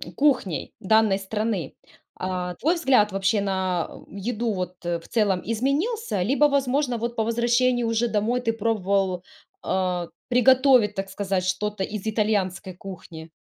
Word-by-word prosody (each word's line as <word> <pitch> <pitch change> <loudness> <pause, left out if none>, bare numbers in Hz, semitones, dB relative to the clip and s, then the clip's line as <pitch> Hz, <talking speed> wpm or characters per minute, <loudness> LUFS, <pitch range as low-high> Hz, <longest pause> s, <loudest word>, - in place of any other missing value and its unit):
кухней 245 - +1
данной 220 -1 +3
страны, 205 -4 -3 0.4
а, 180 -1 -3
твой 325 - +1
взгляд, 260 - +3
вообще, 195 +2 +1
на 190 -3 -1 0.2
еду 225 +4 -2
вот, 180 -1 -4
э, 170 -1 -1
в - - -16
целом 205 -6 +1
изменился? 275 - -1
Либо, 275 +8 +3
возможно, 275 -2 +1
вот 235 +1 -3
по 220 - +1
возвращении 240 +2 +2
уже 230 +1 +1
домой 230 +3 0
ты 230 -2 +1
пробовал, 195 -4 0 0.4
э, 180 -2 -1 0.2
приготовить, 250 -3 +5
так 195 0 -3
сказать, 190 -1 -2
что-то 210 +1 -1
из 210 +1 -5
итальянской 205 -4 0
кухни? 175 -3 -10
210 Hz, 140 wpm, -24 LUFS, 190-240 Hz, 0.4 s, приготовить